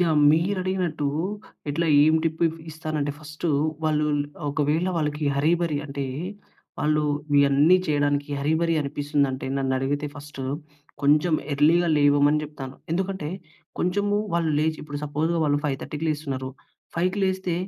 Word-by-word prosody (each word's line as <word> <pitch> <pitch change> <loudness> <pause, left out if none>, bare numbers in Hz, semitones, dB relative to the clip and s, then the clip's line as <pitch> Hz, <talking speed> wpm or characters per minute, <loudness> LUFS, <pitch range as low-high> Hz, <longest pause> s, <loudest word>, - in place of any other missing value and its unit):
Yeah! 165 -4 +3
మీరడిగినట్టు 180 -2 0 0.6
ఇట్లా 165 +3 0 0.2
ఏం 155 +1 +5
tip 160 +1 -1
if 165 0 -3
ఇస్తానంటే 155 -2 -3
ఫస్టు, 155 +2 -5 0.4
వాళ్ళు 150 -1 +2
ల్ - - -1 0.3
ఒకవేళ 150 +4 +1
వాళ్ళకి 150 -1 -1
హర్రీ 150 +4 +3
బరి 165 -4 0
అంటే, 140 0 -4 0.7
వాళ్ళు 150 0 +2 0.4
ఇయన్నీ 140 +5 +5
చేయడానికి 145 -1 +1
హర్రీ 145 +3 +1
బరి 165 -1 +2
అనిపిస్తుందంటే 140 -2 -1
నన్నడిగితే 135 +2 0
ఫస్టు 145 -2 -8 0.6
కొంచెం 150 +3 +4 0.2
ఎర్లీగా 165 +5 +4
లేవమని 145 +1 +4
చెప్తాను. 135 -3 -8 0.2
ఎందుకంటే, 190 -3 -2 0.5
కొంచెము 205 +3 +1 0.2
వాళ్ళు 165 -2 +1
లేచి 155 0 0
ఇప్పుడు 145 -1 -6
సపోజ్‌ 150 +3 -1
వాళ్ళు 145 -1 +2
5:30కి 150 +2 -3
లేస్తున్నారు. 135 -4 -3 0.5
5కి 185 +4 0
లేస్తే, 190 -2 -1
150 Hz, 130 wpm, -25 LUFS, 145-165 Hz, 0.7 s, ఏం